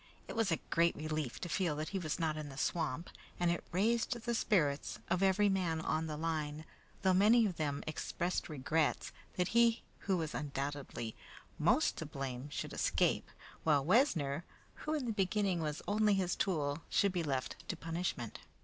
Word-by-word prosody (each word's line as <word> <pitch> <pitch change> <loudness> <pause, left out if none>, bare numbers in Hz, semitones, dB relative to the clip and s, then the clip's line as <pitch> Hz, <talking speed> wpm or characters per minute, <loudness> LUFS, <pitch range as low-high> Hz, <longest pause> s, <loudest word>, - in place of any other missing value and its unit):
It - - -6
was 225 -4 +2
a 165 - +3
great 170 0 +4
relief 155 -4 -3
to - - -3
feel 170 -1 0
that 155 +1 -3
he 195 - -2
was 155 -4 -2
not 160 -2 0
in 155 -1 -5
the 135 - -10
swamp, 165 +1 -1 0.3
and 175 -1 +3
it 170 - -2
raised 225 +7 +2
the 235 +1 -2
spirits 155 -11 +1
of 180 - +2
every 195 +2 +4
man 180 -5 +1
on 160 0 0
the 150 -1 -4
line, 155 -1 -2 0.4
though 190 -1 +5
many 220 +5 +6
of 185 -5 -2
them 145 -2 -1
expressed 175 +3 -2
regrets 155 +1 0 0.2
that 180 0 +1
he 235 0 +4 0.2
who 190 -2 +1
was 160 -2 -2
undoubtedly 140 -5 -4 0.4
most - - +3
to - - -4
blame 135 0 -5
should 145 - -4
escape, - - +1 0.3
while 145 -3 +3
Wessner, 170 - +3 0.3
who 305 +1 -3
in 290 -4 -1
the 235 - 0
beginning 195 -3 +1
was 150 -1 -3
only 210 0 +3
his 185 -2 +1
tool, 150 -4 0
should 200 - +3
be 180 -2 -1
left 135 -5 -2
to - - 0
punishment. 165 -8 -3
165 Hz, 180 wpm, -35 LUFS, 150-195 Hz, 0.4 s, many